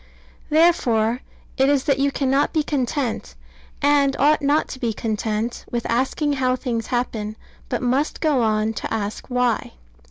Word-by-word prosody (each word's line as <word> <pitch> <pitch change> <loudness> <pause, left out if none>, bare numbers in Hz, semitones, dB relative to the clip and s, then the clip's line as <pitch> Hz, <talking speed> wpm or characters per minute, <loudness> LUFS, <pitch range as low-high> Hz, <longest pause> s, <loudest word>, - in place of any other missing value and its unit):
Therefore 250 -8 +3 0.4
it 265 +1 +4
is 285 -2 +2
that 280 -3 +1
you 280 +1 +2
cannot 275 +1 +1
be 310 -2 +2
content, 255 - -2 0.5
and 285 -1 +4
ought 300 +2 +4
not 285 +2 +2
to 260 - -7
be 235 -3 -1
content, 220 +1 -2
with 235 -1 -2
asking 265 +5 0
how 255 -2 +1
things 235 -4 -3
happen, 220 -4 -2 0.3
but 250 -1 -2
must 260 +5 0
go 300 -6 +2
on 215 0 +1
to - - -5
ask 210 -1 -3
why. 250 - 0
255 Hz, 155 wpm, -22 LUFS, 225-285 Hz, 0.5 s, it